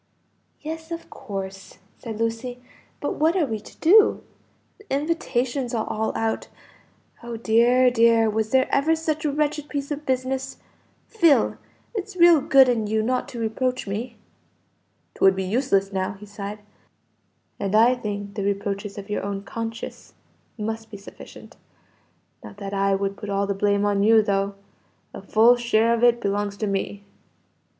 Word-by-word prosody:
"Yes, 320 Hz, +1 st, -6 dB
of 335 Hz, 0 st, -7 dB
course," 195 Hz, -5 st, -7 dB, 0.2 s
said 225 Hz, -3 st, -6 dB
Lucy. 230 Hz, +2 st, -3 dB, 0.4 s
"But -, -, -3 dB
what 320 Hz, +4 st, +2 dB
are 355 Hz, -5 st, +2 dB
we 220 Hz, -5 st, -3 dB
to 210 Hz, -, -15 dB
do? 410 Hz, +6 st, +5 dB, 0.6 s
the 415 Hz, -, -17 dB
invitations 270 Hz, -4 st, -1 dB
are 220 Hz, -, -1 dB
all 220 Hz, 0 st, -1 dB
out. 225 Hz, 0 st, -2 dB, 0.7 s
Oh 235 Hz, -1 st, -6 dB
dear, 240 Hz, +3 st, +4 dB
dear, 230 Hz, -1 st, +4 dB
was 220 Hz, 0 st, -1 dB
there 260 Hz, +1 st, +3 dB
ever 315 Hz, +4 st, +3 dB
such 315 Hz, -1 st, -2 dB
a 295 Hz, -, +1 dB
wretched 295 Hz, 0 st, -1 dB
piece 285 Hz, 0 st, -4 dB
of 295 Hz, +1 st, -3 dB
business! 260 Hz, 0 st, -2 dB, 0.5 s
Phil, 335 Hz, -10 st, +3 dB, 0.4 s
it's 410 Hz, -3 st, -5 dB
real 340 Hz, -4 st, +6 dB
good 270 Hz, -1 st, +6 dB
in 230 Hz, -4 st, 0 dB
you 220 Hz, +1 st, 0 dB
not 250 Hz, +2 st, -1 dB
to 240 Hz, -, -8 dB
reproach 250 Hz, +3 st, -1 dB
me." 225 Hz, +4 st, -5 dB, 1.0 s
"'Twould 195 Hz, 0 st, +4 dB
be 190 Hz, -, -2 dB
useless 195 Hz, -2 st, 0 dB
now," 190 Hz, 0 st, -1 dB
he 200 Hz, +1 st, -12 dB
sighed, 205 Hz, 0 st, -7 dB, 1.0 s
"and 200 Hz, +1 st, -1 dB
I 230 Hz, +3 st, +6 dB
think 205 Hz, -4 st, -5 dB
the 205 Hz, -, -4 dB
reproaches 200 Hz, 0 st, -3 dB
of 200 Hz, -1 st, -7 dB
your 210 Hz, -, -2 dB
own 200 Hz, 0 st, -4 dB
conscience 225 Hz, +2 st, -7 dB, 0.4 s
must 220 Hz, +1 st, -4 dB
be 205 Hz, -, -9 dB
sufficient. 200 Hz, -, -13 dB, 0.9 s
Not -, -, -11 dB
that 200 Hz, -1 st, -6 dB
I 195 Hz, 0 st, +2 dB
would 195 Hz, 0 st, -2 dB
put 210 Hz, -, -7 dB
all 200 Hz, 0 st, 0 dB
the 200 Hz, -, -1 dB
blame 200 Hz, +1 st, +1 dB
on 200 Hz, -1 st, +1 dB
you, 220 Hz, +1 st, +5 dB
though. 200 Hz, 0 st, -1 dB, 0.6 s
A -, -, -8 dB
full 235 Hz, +3 st, +4 dB
share 235 Hz, -1 st, +2 dB
of 235 Hz, 0 st, -1 dB
it 240 Hz, -1 st, +5 dB
belongs 200 Hz, 0 st, -2 dB
to 215 Hz, -, -2 dB
me." 200 Hz, 0 st, -3 dB
225 Hz, 160 wpm, -24 LUFS, 200-260 Hz, 1.0 s, real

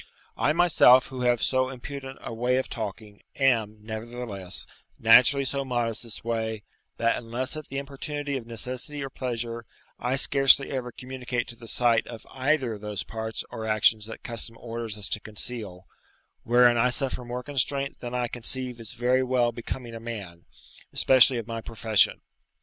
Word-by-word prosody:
I -, -, +2 dB
myself, 155 Hz, -7 st, +6 dB
who 130 Hz, -1 st, -6 dB
have 120 Hz, -1 st, +2 dB
so 130 Hz, 0 st, +2 dB
impudent 135 Hz, +1 st, -7 dB
a -, -, -5 dB
way 125 Hz, +3 st, +1 dB
of 130 Hz, -, -1 dB
talking, 105 Hz, -2 st, -6 dB
am, 115 Hz, -6 st, +2 dB
nevertheless, 110 Hz, -3 st, -4 dB, 0.3 s
naturally 125 Hz, +5 st, +6 dB
so 140 Hz, +1 st, -1 dB
modest 120 Hz, -3 st, -1 dB
this 115 Hz, -3 st, -7 dB
way, 110 Hz, -2 st, -2 dB, 0.3 s
that 115 Hz, 0 st, +2 dB
unless 125 Hz, +4 st, -3 dB
at 155 Hz, -1 st, -7 dB
the 135 Hz, -, -5 dB
importunity 140 Hz, +1 st, -4 dB
of 120 Hz, -4 st, -5 dB
necessity 125 Hz, +5 st, -4 dB
or 135 Hz, -, -6 dB
pleasure, 115 Hz, -3 st, -4 dB, 0.3 s
I 125 Hz, +2 st, 0 dB
scarcely 135 Hz, 0 st, +4 dB
ever 125 Hz, -3 st, -3 dB
communicate 125 Hz, -1 st, -4 dB
to 120 Hz, -, -6 dB
the 115 Hz, 0 st, -13 dB
sight 120 Hz, -1 st, +2 dB
of 115 Hz, -2 st, -9 dB
any -, -, -11 dB
either 130 Hz, -8 st, +1 dB
those 105 Hz, -2 st, -4 dB
parts 110 Hz, -1 st, -5 dB
or 110 Hz, 0 st, -5 dB
actions 110 Hz, 0 st, +3 dB
that 115 Hz, -, -9 dB
custom 115 Hz, -1 st, -5 dB
orders 115 Hz, -2 st, -5 dB
us 100 Hz, -2 st, -2 dB
to -, -, -1 dB
conceal, 105 Hz, -3 st, -5 dB, 0.6 s
wherein 120 Hz, 0 st, +5 dB
I 120 Hz, +2 st, +4 dB
suffer 130 Hz, 0 st, +1 dB
more 125 Hz, +1 st, -5 dB
constraint 140 Hz, 0 st, -1 dB
than 125 Hz, 0 st, -5 dB
I 125 Hz, -1 st, 0 dB
conceive 125 Hz, +1 st, +2 dB
is 115 Hz, 0 st, -2 dB
very 125 Hz, +2 st, +2 dB
well 125 Hz, -2 st, +2 dB
becoming 120 Hz, +1 st, -6 dB
a 115 Hz, -, -6 dB
man, 100 Hz, -7 st, -7 dB, 0.5 s
especially 130 Hz, -1 st, +5 dB
of 115 Hz, -, -4 dB
my 115 Hz, 0 st, -5 dB
profession. 110 Hz, -1 st, +2 dB
120 Hz, 170 wpm, -26 LUFS, 115-130 Hz, 0.6 s, myself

